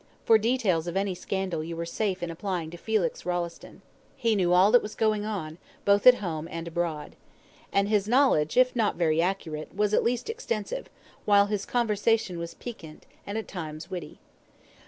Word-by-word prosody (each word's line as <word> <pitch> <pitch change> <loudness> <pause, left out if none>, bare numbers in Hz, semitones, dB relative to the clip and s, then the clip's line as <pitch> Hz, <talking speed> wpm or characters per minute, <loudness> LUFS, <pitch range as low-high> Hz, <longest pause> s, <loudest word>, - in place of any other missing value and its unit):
For 225 -1 +6
details 210 -8 +1
of 175 +2 -2
any 195 -1 0
scandal 185 -3 -3
you 165 +1 -5
were 170 0 -3
safe 190 +1 -2
in 170 - -3
applying 170 -2 -4
to 175 - -8
Felix 205 -3 -1
Rolleston. 175 -1 -4 0.3
He 230 -2 +1
knew 180 -3 +2
all 185 +3 +6
that 245 - +6
was 210 - -7
going 215 -1 +1
on, 180 -7 -5 0.3
both 200 +3 +4
at 250 - +10
home 165 -7 -4
and 165 -1 -6
abroad. 165 -3 -3 0.6
And 200 0 +2
his 205 -1 +1
knowledge, 240 - +3
if 255 0 +4
not 220 -4 +1
very 165 -2 +2
accurate, 170 -4 -3
was 210 +1 +1
at - - +4
least 245 +1 -1
extensive, 455 - -4 0.4
while 200 -1 +5
his 205 -1 -3
conversation 220 -5 +1
was 170 0 -6
piquant, 165 -11 -10 0.2
and 200 +2 -3
at 220 - -4
times 155 -4 -7
witty. 175 -5 -6
195 Hz, 180 wpm, -27 LUFS, 170-215 Hz, 0.6 s, at